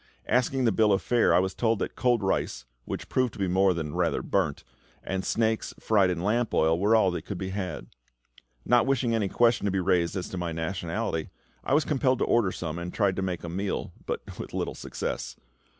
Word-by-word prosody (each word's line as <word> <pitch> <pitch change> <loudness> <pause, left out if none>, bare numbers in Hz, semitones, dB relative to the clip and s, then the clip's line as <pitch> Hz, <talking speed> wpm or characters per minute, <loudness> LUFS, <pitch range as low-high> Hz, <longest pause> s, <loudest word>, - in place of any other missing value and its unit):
Asking 125 +2 +2
the 115 - +4
bill 105 +1 +3
of 95 - +3
fare, 120 -2 +3
I - - +5
was 95 +1 +1
told 115 -2 +1
that - - -4
cold 120 -4 +2
rice - - -1 0.2
which - - -5
proved 130 -3 0
to - - -12
be 95 - +1
more 95 +2 +3
than 80 -4 -3
"rather - - 0
burnt" - - 0 0.4
and 95 0 -2
snakes, 110 -1 0
fried 100 -4 +3
in 90 -1 -2
lamp 115 +4 +1
oil, 80 +1 +3
were 105 +4 +4
all 100 -4 +4
that 90 - -3
could 100 - -5
be 95 0 -4
had. 95 -9 -4 0.8
Not 120 0 +4
wishing 130 -3 +1
any 105 -4 +1
question 120 0 +3
to 100 - +1
be 95 - 0
raised 90 -2 +1
as 90 -2 -3
to 95 - -5
my 85 -2 -3
nationality, 85 +1 -3 0.3
I 135 - +2
was 155 - +3
compelled 130 -3 +2
to - - +1
order 115 -6 +2
some, 80 -2 -4
and 85 +1 -5
tried 100 -3 +1
to - - 0
make 90 -3 -3
a - - -5
meal, 95 +4 -3
but - - -3 0.2
with - - -6
little - - -2
success. - - -5
95 Hz, 220 wpm, -27 LUFS, 90-115 Hz, 0.8 s, I